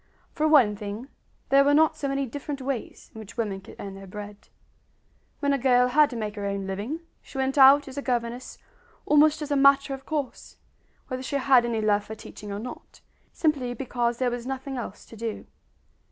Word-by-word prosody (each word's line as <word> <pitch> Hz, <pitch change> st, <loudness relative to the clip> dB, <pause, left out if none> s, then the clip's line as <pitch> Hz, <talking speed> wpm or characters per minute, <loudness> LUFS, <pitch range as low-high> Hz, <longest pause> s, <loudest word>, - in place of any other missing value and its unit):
For 310 Hz, 0 st, 0 dB
one 260 Hz, -9 st, +5 dB
thing, 210 Hz, +5 st, -7 dB, 0.4 s
there 275 Hz, 0 st, +6 dB
were 285 Hz, +1 st, +4 dB
not 315 Hz, +1 st, +4 dB
so 300 Hz, -2 st, -3 dB
many 275 Hz, 0 st, -1 dB
different 285 Hz, +2 st, -6 dB
ways 265 Hz, -2 st, -5 dB
in 220 Hz, -, -10 dB
which 215 Hz, +1 st, -11 dB
women 205 Hz, -4 st, -2 dB
could -, -, -13 dB
earn 195 Hz, -1 st, -7 dB
their 195 Hz, 0 st, -10 dB
bread. 205 Hz, +1 st, -9 dB, 0.9 s
When 285 Hz, -1 st, +2 dB
a 275 Hz, -, 0 dB
girl 250 Hz, -1 st, +4 dB
had 295 Hz, +3 st, +5 dB
to 245 Hz, -, -7 dB
make 215 Hz, -2 st, -3 dB
her 200 Hz, -, -3 dB
own 200 Hz, -1 st, -3 dB
living 205 Hz, -, -4 dB, 0.2 s
she -, -, -11 dB
went 265 Hz, 0 st, 0 dB
out 280 Hz, +1 st, +7 dB
as 270 Hz, +1 st, -6 dB
a -, -, -3 dB
governess 245 Hz, -1 st, -3 dB, 0.5 s
almost 300 Hz, +1 st, +4 dB
as 295 Hz, -, -6 dB
a -, -, +3 dB
matter 275 Hz, 0 st, +4 dB
of 270 Hz, 0 st, -9 dB
course, 295 Hz, -5 st, -4 dB, 0.5 s
whether 255 Hz, -1 st, -4 dB
she 265 Hz, -, -4 dB
had 265 Hz, -3 st, +4 dB
any 230 Hz, -2 st, -1 dB
love 210 Hz, -1 st, +2 dB
for 220 Hz, +1 st, -8 dB
teaching 210 Hz, -1 st, -10 dB
or 200 Hz, -, -3 dB
not, 240 Hz, +4 st, -9 dB, 0.3 s
simply 275 Hz, -6 st, 0 dB
because 240 Hz, -1 st, -1 dB
there 250 Hz, -1 st, 0 dB
was 245 Hz, 0 st, -5 dB
nothing 270 Hz, 0 st, -4 dB
else 235 Hz, -5 st, -6 dB
to -, -, -13 dB
do. 225 Hz, -1 st, -5 dB
255 Hz, 205 wpm, -26 LUFS, 220-275 Hz, 0.9 s, out